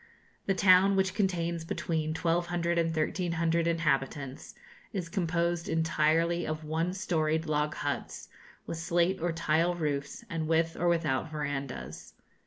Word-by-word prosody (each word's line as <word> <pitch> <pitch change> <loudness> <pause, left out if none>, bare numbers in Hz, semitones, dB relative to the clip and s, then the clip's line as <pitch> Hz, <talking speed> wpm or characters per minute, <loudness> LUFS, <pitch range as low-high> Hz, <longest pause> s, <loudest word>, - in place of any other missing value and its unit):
The 195 - +2
town, 190 +1 +6
which 190 -1 +1
contains 170 -5 0
between 160 -1 -2
1,200 170 +1 0
and 165 - +2
1,300 165 +1 0
inhabitants, 140 -4 -1 0.4
is 180 -5 -3
composed 170 -2 -1
entirely 165 +1 +2
of 155 0 -3
one 160 +3 -1
storied 160 -4 0
log 150 0 0
huts, - - -4 0.4
with 165 - -5
slate 170 +2 +1
or 175 +1 +1
tile 165 +1 +1
roofs, 145 +5 -3
and 165 -5 -3
with 165 0 +2
or 175 - 0
without 160 -4 +1
verandahs. 145 -3 -5
165 Hz, 130 wpm, -30 LUFS, 155-175 Hz, 0.4 s, town